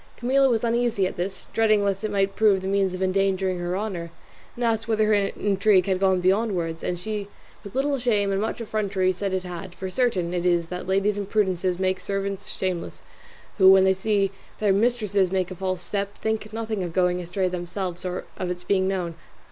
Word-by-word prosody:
Camilla 265 Hz, +2 st, +3 dB
was 230 Hz, -2 st, +1 dB
uneasy 235 Hz, -4 st, +1 dB
at 185 Hz, -, -3 dB
this, 190 Hz, +2 st, -4 dB
dreading 215 Hz, -2 st, +3 dB
lest 195 Hz, +1 st, -1 dB
it 215 Hz, -, -1 dB
might 195 Hz, -1 st, 0 dB
prove 200 Hz, -4 st, +3 dB
the -, -, -2 dB
means 195 Hz, -1 st, +1 dB
of 185 Hz, -, -2 dB
endangering 190 Hz, -1 st, +1 dB
her 175 Hz, +1 st, -2 dB
honour, 190 Hz, -5 st, -4 dB, 0.5 s
and 240 Hz, -, -4 dB
asked 225 Hz, -1 st, 0 dB
whether 220 Hz, -1 st, +2 dB
her 215 Hz, -, +3 dB
intrigue 200 Hz, -1 st, +2 dB
had 190 Hz, -2 st, 0 dB
gone 190 Hz, -1 st, +3 dB
beyond 200 Hz, +4 st, +2 dB
words, 165 Hz, -2 st, -3 dB
and 180 Hz, -, -1 dB
she 205 Hz, +2 st, -4 dB, 0.4 s
with 200 Hz, -, -10 dB
little 275 Hz, +1 st, +1 dB
shame 210 Hz, -5 st, +1 dB
and 195 Hz, 0 st, 0 dB
much 220 Hz, -, -2 dB
effrontery 200 Hz, -4 st, 0 dB
said 195 Hz, +2 st, -3 dB
it 185 Hz, -1 st, -1 dB
had; 180 Hz, 0 st, -7 dB
for 190 Hz, -1 st, -5 dB
certain 190 Hz, -8 st, 0 dB
it 175 Hz, -1 st, -1 dB
is 170 Hz, -2 st, +1 dB
that 180 Hz, 0 st, -5 dB
ladies' 195 Hz, +2 st, +1 dB
imprudences 190 Hz, -3 st, 0 dB
make 185 Hz, 0 st, 0 dB
servants 195 Hz, 0 st, -3 dB
shameless, 185 Hz, -3 st, -4 dB, 0.6 s
who, 190 Hz, 0 st, +9 dB
when 190 Hz, 0 st, +7 dB
they 190 Hz, 0 st, +4 dB
see 195 Hz, 0 st, +1 dB, 0.3 s
their 205 Hz, -2 st, +3 dB
mistresses 205 Hz, -4 st, +1 dB
make 185 Hz, -1 st, 0 dB
a -, -, -5 dB
false 185 Hz, 0 st, -3 dB
step, 200 Hz, +1 st, -3 dB
think 220 Hz, -1 st, -2 dB
nothing 220 Hz, -2 st, -3 dB
of 175 Hz, -2 st, -4 dB
going 180 Hz, 0 st, +2 dB
astray 180 Hz, +2 st, -1 dB
themselves, 180 Hz, 0 st, -4 dB
or 180 Hz, 0 st, -4 dB
of 180 Hz, -, -3 dB
its 180 Hz, 0 st, -4 dB
being 190 Hz, -1 st, +1 dB
known. 180 Hz, -3 st, -2 dB
195 Hz, 205 wpm, -25 LUFS, 185-210 Hz, 0.6 s, who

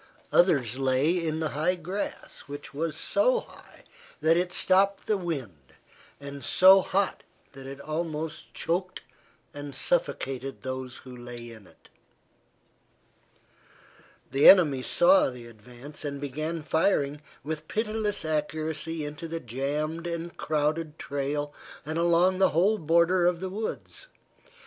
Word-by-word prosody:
Others 135 Hz, -, +3 dB
lay 135 Hz, +3 st, +2 dB
in 160 Hz, 0 st, -2 dB
the 155 Hz, -, 0 dB
high 155 Hz, +6 st, 0 dB
grass 180 Hz, +4 st, -5 dB
which 145 Hz, 0 st, -9 dB
was 155 Hz, +1 st, -2 dB
so 475 Hz, +10 st, +2 dB
high -, -, -17 dB, 0.4 s
that 160 Hz, +1 st, +4 dB
it 180 Hz, +1 st, 0 dB
stopped 195 Hz, +2 st, +3 dB
the 215 Hz, -, +1 dB
wind, 130 Hz, -, -6 dB, 0.4 s
and 140 Hz, 0 st, -8 dB
so 190 Hz, +1 st, +7 dB
hot 195 Hz, +1 st, -1 dB, 0.3 s
that 135 Hz, -1 st, -11 dB
it 135 Hz, +1 st, -8 dB
almost 155 Hz, +1 st, -4 dB
choked 180 Hz, +3 st, -2 dB, 0.5 s
and 145 Hz, -1 st, -7 dB
suffocated 135 Hz, -, -2 dB
those 130 Hz, -1 st, -5 dB
who 130 Hz, -1 st, -10 dB
lay 120 Hz, -1 st, -9 dB
in 110 Hz, -4 st, -13 dB
it. -, -, -22 dB, 2.4 s
The 135 Hz, +2 st, +7 dB
enemy 155 Hz, -9 st, +6 dB
saw 270 Hz, -, +4 dB
the 125 Hz, -2 st, -10 dB
advance 120 Hz, +6 st, -11 dB
and 140 Hz, -1 st, -4 dB
began 155 Hz, +4 st, -4 dB
firing 150 Hz, -3 st, +1 dB, 0.2 s
with 155 Hz, +1 st, -5 dB
pitiless 215 Hz, -3 st, -2 dB
accuracy 155 Hz, +1 st, -2 dB
into 150 Hz, +3 st, -6 dB
the 165 Hz, 0 st, -4 dB
jammed 150 Hz, +6 st, -3 dB
and 170 Hz, 0 st, -5 dB
crowded 155 Hz, +1 st, -1 dB
trail 145 Hz, +1 st, -3 dB, 0.3 s
and 155 Hz, +2 st, -3 dB
along 175 Hz, +2 st, +3 dB
the 190 Hz, -, +5 dB
whole 200 Hz, +7 st, +2 dB
border 170 Hz, +2 st, +3 dB
of 175 Hz, -1 st, +1 dB
the 190 Hz, +1 st, -4 dB
woods. 220 Hz, -, -6 dB
155 Hz, 130 wpm, -27 LUFS, 140-175 Hz, 2.4 s, so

